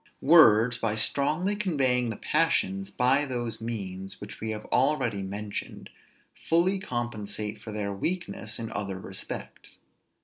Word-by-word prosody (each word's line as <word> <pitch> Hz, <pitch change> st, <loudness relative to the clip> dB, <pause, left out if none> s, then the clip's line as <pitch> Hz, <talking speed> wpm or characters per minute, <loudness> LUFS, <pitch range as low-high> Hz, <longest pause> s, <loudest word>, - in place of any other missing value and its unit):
Words, 125 Hz, -7 st, +6 dB
by 110 Hz, -2 st, 0 dB
strongly 155 Hz, -, +1 dB
conveying 135 Hz, -, +1 dB
the 110 Hz, -, -3 dB
passions 95 Hz, -12 st, +1 dB
by 130 Hz, +7 st, +3 dB
those 120 Hz, -5 st, -3 dB
means 95 Hz, -4 st, -5 dB
which 100 Hz, 0 st, -9 dB
we 110 Hz, -, -3 dB
have 110 Hz, -1 st, -4 dB
already 130 Hz, -6 st, +2 dB
mentioned, 100 Hz, +2 st, -6 dB, 0.4 s
fully 180 Hz, +4 st, +1 dB
compensate 110 Hz, -, -4 dB
for 110 Hz, -, -7 dB
their 105 Hz, -1 st, -3 dB
weakness 115 Hz, -, -3 dB
in 115 Hz, -1 st, -5 dB
other 100 Hz, -2 st, -4 dB
respects. 95 Hz, 0 st, -8 dB
115 Hz, 130 wpm, -28 LUFS, 105-140 Hz, 0.4 s, Words